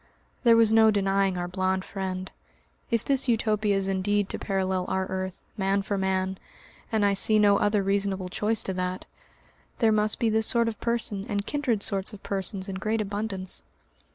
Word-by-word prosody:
There 230 -2 +6
was 225 -1 +4
no 220 0 +6
denying 195 -2 +1
our 175 0 -3
blond 185 +1 -1
friend. 190 -1 -5 0.6
If 230 -3 0
this 275 -1 +2
Utopia 215 -3 +1
is 195 0 -1
indeed 195 +1 0
to - - -4
parallel 190 -2 -1
our 190 0 -1
earth, 190 -1 -5
man 195 0 +1
for 205 - -2
man 190 -1 -1 0.5
and 220 -2 +2
I 200 - +3
see 215 +2 +5
no 205 -1 +5
other 205 -1 +2
reasonable 195 -1 -1
choice 215 +4 0
to 190 - -3
that 180 0 -3 0.7
there 225 -3 +3
must 215 0 +1
be 230 -2 +1
this 220 0 +3
sort 235 -1 +3
of 225 - -4
person 230 -3 -2
and 205 -1 -2
kindred 255 -7 -1
sorts 195 0 -1
of 205 - -11
persons 195 -1 -3
in 190 -1 -4
great 215 +3 -1
abundance. 200 -2 -4
200 Hz, 180 wpm, -26 LUFS, 190-215 Hz, 0.7 s, There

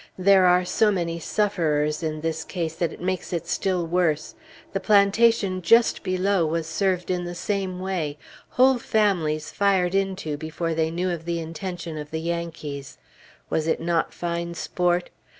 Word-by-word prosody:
There 190 0 +5
are 180 0 +4
so 215 +4 +3
many 170 -3 -2
sufferers 155 -6 0
in 155 -1 -3
this 160 0 -2
case 165 -3 -3
that 170 -3 0
it - - -11
makes 185 0 -2
it 170 -2 -2
still 180 -1 0
worse. 165 -3 0 0.4
The 195 - 0
plantation 200 -1 +3
just 230 +7 +4
below 185 -1 +1
was 160 +1 -1
served 180 +2 0
in 180 -1 -1
the 175 0 -5
same 190 0 -2
way; 175 -6 -2 0.3
whole 260 0 +4
families 175 -10 0
fired 190 -3 +2
into 190 -6 -1
before 160 +2 -3
they 160 0 +1
knew 180 +2 -1
of 165 -2 -5
the 170 0 -1
intention 165 0 -5
of 150 0 -7
the 160 - -3
Yankees; 160 -4 -5 0.5
was 160 0 0
it 160 - +1
not 165 0 0
fine 170 0 -3
sport? 175 +1 0
175 Hz, 165 wpm, -24 LUFS, 160-190 Hz, 0.5 s, There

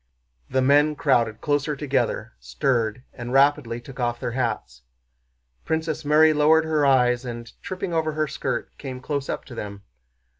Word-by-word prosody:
The 130 - +1
men 145 +3 +4
crowded 120 -7 +1
closer 145 0 0
together, 140 - -1
stirred, 115 - -1
and 120 0 -7
rapidly 135 -3 +3
took 135 +2 -12
off 120 -1 -1
their - - -3
hats. 110 - -3 0.8
Princess 160 -1 -2
Mary 155 +2 +5
lowered 155 +2 +4
her 155 -2 +2
eyes 125 -2 +3
and, 120 -2 -7
tripping 185 -1 -4
over 160 -1 0
her 155 0 0
skirt, 135 -2 -4
came 130 -2 -6
close 140 +1 -3
up - - -3
to 130 - -11
them. 100 -3 -7
135 Hz, 155 wpm, -24 LUFS, 120-150 Hz, 0.8 s, Mary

